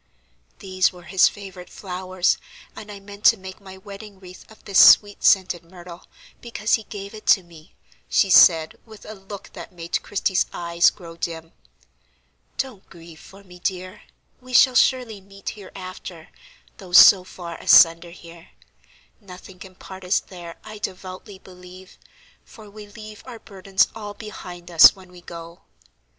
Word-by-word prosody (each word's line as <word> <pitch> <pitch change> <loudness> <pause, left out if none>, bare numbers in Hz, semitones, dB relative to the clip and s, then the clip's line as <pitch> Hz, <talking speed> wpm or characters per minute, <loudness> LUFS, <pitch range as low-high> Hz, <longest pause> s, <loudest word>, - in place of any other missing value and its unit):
"These 185 -1 0
were 180 -1 -15
his 180 +2 +3
favorite 190 -3 -9
flowers, 185 -1 -2 0.4
and 210 - -10
I 200 - -10
meant 200 +1 -14
to 225 - +6
make 190 +1 -11
my 190 -1 -12
wedding 200 +1 -12
wreath 185 -1 -15
of 220 - -20
this 200 -1 +2
sweet 205 -1 +5
scented 185 -3 +2
myrtle, 175 0 -14 0.3
because 230 -2 -3
he 220 - +1
gave 200 0 -9
it 215 - -13
to 190 - +4
me," 165 -2 -18 0.3
she 195 - +2
said, 165 -3 +5
with 220 -2 -16
a 215 - -9
look 195 0 -12
that - - -10
made 170 -1 -4
Christie's 190 -2 -1
eyes 170 0 +2
grow 165 -3 -13
dim. 165 -1 -6 1.1
"Don't 250 -8 -6
grieve 165 -2 -15
for 195 +1 -16
me, 180 -2 -16
dear; 185 +1 -5 0.4
we 255 0 -13
shall 255 +1 +5
surely 245 -5 +1
meet 195 0 -9
hereafter, 185 -4 -11 0.5
though 185 -3 -13
so 185 +1 +8
far 175 -2 -10
asunder 165 +1 +5
here. 170 -1 -15 0.7
Nothing 185 -1 -14
can 185 0 -13
part 190 +1 -12
us 180 +2 +1
there, 175 -3 -12
I 215 -1 -11
devoutly 190 +1 -8
believe; 185 0 -16 0.4
for 215 -3 -16
we 210 0 -12
leave 215 0 -12
our 245 -2 -9
burdens 195 -2 -1
all 210 -2 -9
behind 180 -5 -11
us 165 -2 +8
when 185 -2 -17
we 180 -1 -15
go." 170 0 -11
190 Hz, 160 wpm, -22 LUFS, 175-205 Hz, 1.1 s, so